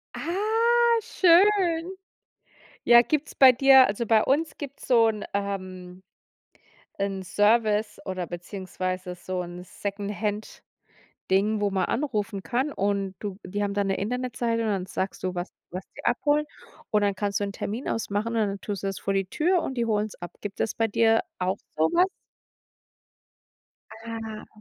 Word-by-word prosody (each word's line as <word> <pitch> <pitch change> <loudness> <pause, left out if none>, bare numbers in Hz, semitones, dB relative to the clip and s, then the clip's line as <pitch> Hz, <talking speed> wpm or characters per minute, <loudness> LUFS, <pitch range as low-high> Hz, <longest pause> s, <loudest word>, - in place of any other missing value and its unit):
Ah, 460 +5 +2
schön. 360 -2 +3 0.9
Ja, 235 0 +8
gibt's 295 +5 -2
bei 265 -1 +8
dir 265 +1 +7
also, 210 +4 -2
bei 220 -1 +4
uns 295 +3 0
gibt's 280 -2 -8
so 230 -3 +5
'n, 215 -2 -2
ähm 185 -2 -5 1.0
'nen 195 -1 -2
Service 210 +2 +2
oder 185 -2 -3
beziehungsweise 185 0 -5
so 185 +1 -4
'n 175 0 -8
Secondhand-Ding, 205 +2 -5 0.8
wo 205 -1 +1
man 190 -1 0
anrufen 215 -7 -2
kann 260 +7 -1
und 200 -2 -1
du 200 -3 -6
die 205 +3 -3
haben 200 -1 -1
dann 200 -1 0
'ne 195 - +1
Internetseite 235 +1 -1
und 225 - -1
dann 195 -3 -1
sagst 190 +1 -4
du, 185 -1 -2
was 175 +1 -4 0.2
was 180 +1 -6
die - - -10
abholen. 295 +4 +2 0.4
Und 210 - +3
dann 200 -1 +2
kannst 200 +1 -1
du - - +1
'nen 200 - -4
Termin 220 +6 -4
ausmachen 215 -1 -1
und 220 -2 +2
dann 200 0 -4
tust 200 -3 -5
du - - -2
das 195 -1 -3
vor 195 - -1
die 195 -1 0
Tür 340 - +1
und 265 - -4
die 235 -2 -1
holen's 215 -1 -1
ab. 175 - -6
Gibt 205 -1 -7
es 225 - 0
bei 225 - +1
dir 225 +1 +3 0.2
auch 185 +2 0 0.2
so 155 - +2
was? 360 +2 +5 2.0
Ah. 225 -1 -6
210 Hz, 160 wpm, -26 LUFS, 195-250 Hz, 2.0 s, Ja